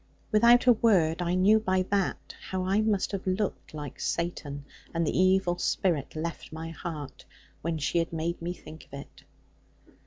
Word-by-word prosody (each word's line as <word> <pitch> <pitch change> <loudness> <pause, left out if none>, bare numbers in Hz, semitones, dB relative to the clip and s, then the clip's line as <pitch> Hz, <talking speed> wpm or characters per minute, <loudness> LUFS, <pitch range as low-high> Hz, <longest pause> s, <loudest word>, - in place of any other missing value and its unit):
Without 235 +3 +6
a 245 - +8
word, 180 -8 +3
I 175 +1 0
knew 200 +4 +5
by 185 -3 +1
that, 200 -2 -1 0.2
how 185 -1 -1
I 195 +3 +2
must 215 -3 +1
have 195 -1 -4
looked 190 +2 -2
like 145 -2 -7
Satan; 145 -4 -3 0.3
and 165 0 +1
the - - -1
evil 185 -1 +3
spirit 160 -8 0
left 165 +2 -5
my 160 +1 -6
heart; 155 -4 -7 0.4
when 165 0 -2
she 155 +3 0
had 165 - -1
made 165 +1 -3
me 170 +1 -2
think 160 -3 -11
of - - -7
it. - - -13
175 Hz, 175 wpm, -28 LUFS, 160-195 Hz, 0.4 s, a